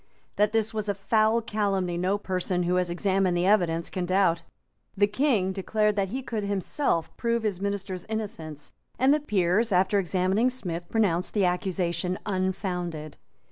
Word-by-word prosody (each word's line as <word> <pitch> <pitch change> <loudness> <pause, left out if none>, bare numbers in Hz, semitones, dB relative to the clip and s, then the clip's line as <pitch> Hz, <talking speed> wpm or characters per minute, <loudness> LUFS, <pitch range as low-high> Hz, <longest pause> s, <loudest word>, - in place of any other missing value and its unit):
That 210 0 +3
this 225 0 0
was 215 -1 -3
a 200 - 0
foul 220 +3 +2
calumny 195 -5 -1
no 185 +3 +1
person 185 -2 -1
who 180 +1 +1
has 180 -1 +1
examined 185 0 +1
the 175 - +1
evidence 175 -5 +2
can 180 -1 -3
doubt. 185 -3 +2 0.6
The 205 - +5
King 210 -4 +1
declared 210 +2 0
that 195 -2 0
he 260 +5 -4
could 225 -4 -3
himself 200 - -1
prove 235 -1 0
his 200 -4 -1
minister's 195 -2 -3
innocence; 205 -10 -5 0.3
and 265 +3 +4
the 305 - +2
Peers, 210 - +1
after 190 +2 +3
examining 190 +5 +1
Smith, 175 -9 -5
pronounced 190 -5 +1
the 200 -3 +3
accusation 180 -1 -1
unfounded. 180 -5 -3
195 Hz, 160 wpm, -27 LUFS, 180-215 Hz, 0.6 s, The